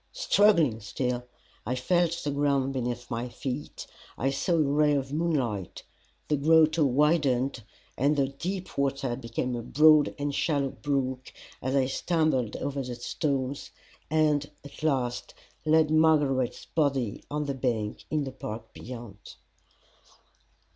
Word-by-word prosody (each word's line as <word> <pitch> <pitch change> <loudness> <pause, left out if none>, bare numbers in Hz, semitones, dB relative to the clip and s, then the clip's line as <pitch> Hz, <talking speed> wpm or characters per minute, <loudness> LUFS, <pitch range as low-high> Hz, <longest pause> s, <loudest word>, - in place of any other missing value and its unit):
Struggling 200 - +3
still, 125 +3 -3 0.4
I 125 +4 -2
felt 170 +5 +1
the 145 - -1
ground 140 -1 +1
beneath 120 -2 -3
my 120 +1 -3
feet, 130 +4 -5 0.3
I 135 +3 0
saw 140 +6 0
a - - +3
ray 150 0 +3
of 135 0 -2
moonlight 135 - -1 0.4
the 150 - +1
grotto 160 +2 +4
widened, 135 -2 +2 0.3
and 140 +4 +2
the 135 -2 +1
deep 180 +5 -5
water 135 -3 0
became 120 0 -3
a 120 - -3
broad 150 +4 +5
and 145 0 -2
shallow 140 -2 0
brook 130 -3 -2 0.3
as 130 +2 -1
I 135 -2 +3
stumbled 135 -4 0
over 140 0 -3
the 125 -2 -5
stones 135 +2 -2 0.4
and 150 -2 +2
at 140 - -12
last 130 -5 -1 0.3
laid 155 0 +4
Margaret's 150 -5 +2
body 140 -8 -1
on 150 0 -2
the 140 - -2
bank 115 -5 -2
in 150 -1 0
the 135 - -5
park 110 -3 -7
beyond. 115 -4 -10
140 Hz, 135 wpm, -28 LUFS, 125-150 Hz, 0.4 s, broad